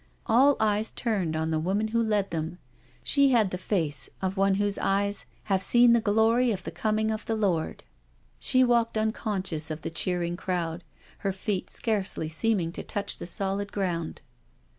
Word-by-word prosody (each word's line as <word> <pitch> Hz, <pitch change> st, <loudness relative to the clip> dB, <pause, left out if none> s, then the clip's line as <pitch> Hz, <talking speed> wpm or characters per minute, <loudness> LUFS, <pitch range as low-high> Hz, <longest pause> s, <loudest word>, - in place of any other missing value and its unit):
All 270 Hz, +5 st, +5 dB
eyes 215 Hz, 0 st, +1 dB
turned 195 Hz, -9 st, -1 dB
on 160 Hz, 0 st, -1 dB
the 160 Hz, -, +1 dB
woman 200 Hz, +6 st, 0 dB
who 230 Hz, +1 st, +1 dB
led 210 Hz, -4 st, 0 dB
them« 165 Hz, +1 st, -3 dB, 0.5 s
She 280 Hz, -1 st, +4 dB
had 225 Hz, -7 st, +3 dB
the 180 Hz, -, -2 dB
face 165 Hz, -7 st, -1 dB
of 190 Hz, 0 st, -2 dB
one 195 Hz, 0 st, +3 dB
whose 205 Hz, 0 st, 0 dB
eyes 200 Hz, +1 st, 0 dB
" -, -, -34 dB
have 190 Hz, -1 st, +3 dB
seen 240 Hz, +3 st, +6 dB
the 235 Hz, -, +4 dB
glory 225 Hz, +3 st, +3 dB
of 200 Hz, -, -3 dB
the -, -, -5 dB
coming 220 Hz, 0 st, 0 dB
of 215 Hz, 0 st, -3 dB
the 225 Hz, -, 0 dB
Lord.'^ 185 Hz, -7 st, -1 dB, 0.6 s
She 255 Hz, 0 st, +4 dB
walked 235 Hz, -2 st, +2 dB
un 220 Hz, 0 st, +1 dB
conscious 190 Hz, -9 st, -2 dB
of 155 Hz, 0 st, -5 dB
the -, -, -4 dB
cheering 175 Hz, 0 st, -1 dB
crowd, 175 Hz, -2 st, -3 dB, 0.4 s
her 195 Hz, -, -1 dB
feet 190 Hz, 0 st, -3 dB
scarcely 200 Hz, -7 st, -1 dB
seem 200 Hz, +7 st, +1 dB
ing 165 Hz, -1 st, -2 dB
to -, -, -5 dB
touch 205 Hz, -2 st, -3 dB
the -, -, -6 dB
solid 195 Hz, +2 st, -3 dB
ground. 175 Hz, -5 st, -3 dB
200 Hz, 185 wpm, -27 LUFS, 175-220 Hz, 0.6 s, seen